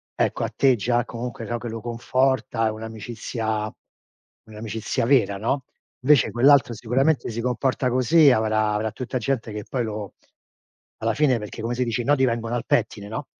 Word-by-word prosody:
ecco -, -, 0 dB
a -, -, -1 dB
te 135 Hz, -2 st, +4 dB
già 120 Hz, +2 st, 0 dB
comunque, 120 Hz, -1 st, -6 dB
no, 120 Hz, +2 st, -2 dB
che 120 Hz, -, -6 dB
lo 115 Hz, 0 st, -5 dB
conforta, 120 Hz, 0 st, 0 dB
è -, -, 0 dB
un'amicizia 110 Hz, 0 st, -4 dB, 0.7 s
un'amicizia 110 Hz, +1 st, -3 dB
vera, 120 Hz, -6 st, +3 dB
no, 125 Hz, +6 st, -1 dB, 0.4 s
invece 135 Hz, -2 st, +4 dB
quell'altro 130 Hz, 0 st, +5 dB
sicuramente 125 Hz, +5 st, +1 dB
si 115 Hz, -, -5 dB
comporta 125 Hz, +1 st, 0 dB
così, 135 Hz, +5 st, +5 dB
avrà 110 Hz, -2 st, +1 dB
avrà 110 Hz, +1 st, -1 dB
tutta 130 Hz, +2 st, -4 dB
gente 120 Hz, -1 st, -2 dB
che 105 Hz, 0 st, -5 dB
poi 125 Hz, -2 st, -1 dB
lo 105 Hz, -2 st, -5 dB, 0.9 s
alla 115 Hz, 0 st, +1 dB
fine, 135 Hz, -6 st, +3 dB
perché 105 Hz, +1 st, -7 dB
come 115 Hz, +2 st, -1 dB
si 125 Hz, -, 0 dB
dice, 120 Hz, 0 st, -1 dB
i -, -, -9 dB
nodi 140 Hz, -1 st, +3 dB
vengono 115 Hz, -1 st, -2 dB
al 120 Hz, -, -2 dB
pettine, 105 Hz, -3 st, 0 dB
no? 110 Hz, -, -5 dB
115 Hz, 175 wpm, -24 LUFS, 110-130 Hz, 0.9 s, quell'altro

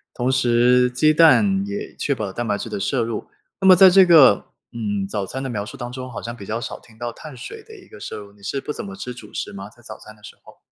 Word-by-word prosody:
同 125 Hz, +1 st, 0 dB
时， 125 Hz, 0 st, +3 dB
鸡 155 Hz, +5 st, +2 dB
蛋 195 Hz, +5 st, +4 dB
也 205 Hz, +1 st, -6 dB
确 140 Hz, -, -1 dB
保 110 Hz, -, -4 dB
了 95 Hz, -, -6 dB
蛋 120 Hz, +3 st, -4 dB
白 105 Hz, -1 st, 0 dB
质 115 Hz, -, -6 dB
的 105 Hz, -2 st, -4 dB
摄 120 Hz, +3 st, 0 dB
入。 115 Hz, -2 st, -5 dB, 0.3 s
那 190 Hz, -, +2 dB
么 185 Hz, -, +9 dB
在 190 Hz, 0 st, +8 dB
这 190 Hz, 0 st, +6 dB
个， 145 Hz, -, +6 dB, 0.3 s
嗯， 105 Hz, -4 st, -3 dB
早 100 Hz, 0 st, -3 dB
餐 130 Hz, +7 st, -5 dB
的 135 Hz, -, -4 dB
描 105 Hz, -3 st, -4 dB
述 120 Hz, -, -10 dB
当 120 Hz, -2 st, -7 dB
中， 130 Hz, 0 st, -7 dB
好 120 Hz, -, -7 dB
像 115 Hz, -, -6 dB
比 100 Hz, -5 st, -11 dB
较 115 Hz, +4 st, -4 dB
少 -, -, -6 dB
听 110 Hz, -1 st, -21 dB
到 120 Hz, 0 st, -4 dB
碳 150 Hz, +3 st, -11 dB
水 440 Hz, -, -9 dB
的 440 Hz, 0 st, -15 dB
一 390 Hz, -, -17 dB
个 -, -, -13 dB
摄 -, -, -7 dB
入， 100 Hz, -1 st, -12 dB
你 100 Hz, -, -24 dB
是 135 Hz, +7 st, -4 dB
不 -, -, -5 dB
怎 215 Hz, -, -6 dB
么 195 Hz, 0 st, -8 dB
吃 125 Hz, -10 st, -7 dB
主 110 Hz, -4 st, -13 dB
食 -, -, -5 dB
吗？ 100 Hz, 0 st, -8 dB
在 120 Hz, +3 st, -20 dB
早 110 Hz, -, -10 dB
餐 110 Hz, -, -14 dB
的 105 Hz, -, -26 dB
时 -, -, -12 dB
候。 -, -, -18 dB
120 Hz, 315 characters per minute, -21 LUFS, 110-155 Hz, 0.3 s, 么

